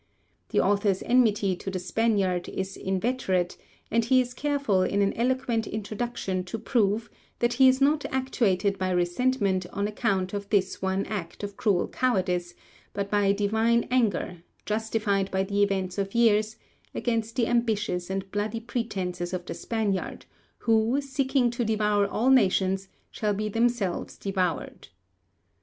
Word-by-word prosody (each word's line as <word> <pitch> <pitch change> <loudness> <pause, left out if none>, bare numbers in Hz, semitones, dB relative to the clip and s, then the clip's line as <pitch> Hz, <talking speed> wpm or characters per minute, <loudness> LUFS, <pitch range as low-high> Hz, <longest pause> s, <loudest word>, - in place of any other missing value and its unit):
The - - +1
author's 200 -1 +2
enmity 210 -6 +3
to 195 - -6
the 190 - -3
Spaniard 185 -1 0
is 190 0 -4
inveterate, 190 -2 -1 0.4
and 230 +1 +3
he 255 +3 +4
is 250 -1 -1
careful 280 -8 +1
in 200 +2 +1
an 200 - +1
eloquent 240 -2 0
introduction 215 -3 -3
to 185 - -4
prove 220 -1 +1 0.3
that 240 0 +1
he 260 +2 +6
is 260 0 +4
not 290 +2 +3
actuated 210 -7 0
by 185 0 0
resentment 185 +1 +1
on 200 +1 -1
account 195 -3 -1
of 200 0 -4
this 190 -3 +1
one 190 +1 0
act 200 -3 -5
of 200 0 -5
cruel 205 -7 +1
cowardice, 180 -8 0 0.4
but 200 0 -3
by 205 -1 +3
a - - +5
divine 220 +3 +2
anger, 215 -7 +1 0.3
justified 210 -2 0
by 190 0 0
the 200 +1 -1
events 195 -2 0
of 195 +2 -3
years, 220 -2 +3 0.4
'against 230 -2 -1
the 235 - +2
ambitious 220 -7 0
and 190 0 -4
bloody 210 +2 -2
pretences 190 -7 -3
of 180 -1 -3
the - - -5
Spaniard, 210 -5 -2 0.3
who, 225 +3 +2
seeking 270 -2 +1
to 240 0 -2
devour 210 -2 +2
all 240 +6 +1
nations, 195 -5 +3 0.2
shall 210 -2 -1
be 215 +1 -2
themselves 225 -4 -1
devoured.' 185 -3 -2
205 Hz, 150 wpm, -27 LUFS, 190-235 Hz, 0.4 s, he